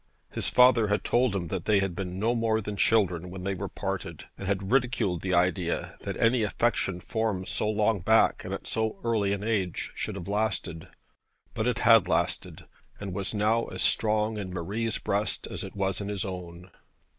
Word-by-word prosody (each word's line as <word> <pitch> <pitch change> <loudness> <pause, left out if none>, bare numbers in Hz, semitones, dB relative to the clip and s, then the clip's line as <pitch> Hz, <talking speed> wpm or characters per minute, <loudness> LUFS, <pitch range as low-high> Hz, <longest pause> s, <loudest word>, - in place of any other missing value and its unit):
His - - -1
father 125 -3 +5
had 105 0 0
told 120 -3 +2
him 85 -4 -3
that - - -3
they 105 - +4
had 95 -3 0
been 90 -1 -4
no 110 +4 +1
more 115 -2 +1
than 105 -1 -5
children 90 -5 +2
when 90 0 -7
they 100 +1 -1
parted, 95 -2 -5
and 100 - -7
had 95 0 -1
ridiculed 120 -9 +1
the 95 -1 0
idea 90 0 0
that - - -4
any 115 +1 +3
affection 105 -3 0
formed 105 -2 -2
so 105 - -1
long 110 0 +2
back 110 +5 +3
and - - -6
at - - -5
so 110 -1 -2
early 110 -4 +1
an 100 0 -2
age 100 -6 -1
should - - -4
have 95 -2 -7
lasted. 100 -5 -2 0.7
But 110 0 -1
it 125 -1 +1
had 115 -5 +6
lasted; - - -1 0.3
and 100 -3 -5
was 100 +3 -3
now 110 +3 +2
as - - -3
strong 110 0 +1
in 95 -2 -5
Marie's 105 +6 -2
breast 100 0 -1
as - - -5
it - - -8
was 95 0 -1
in 100 - -4
his 100 -3 -2
own. 90 -1 -7
100 Hz, 190 wpm, -28 LUFS, 95-110 Hz, 0.7 s, had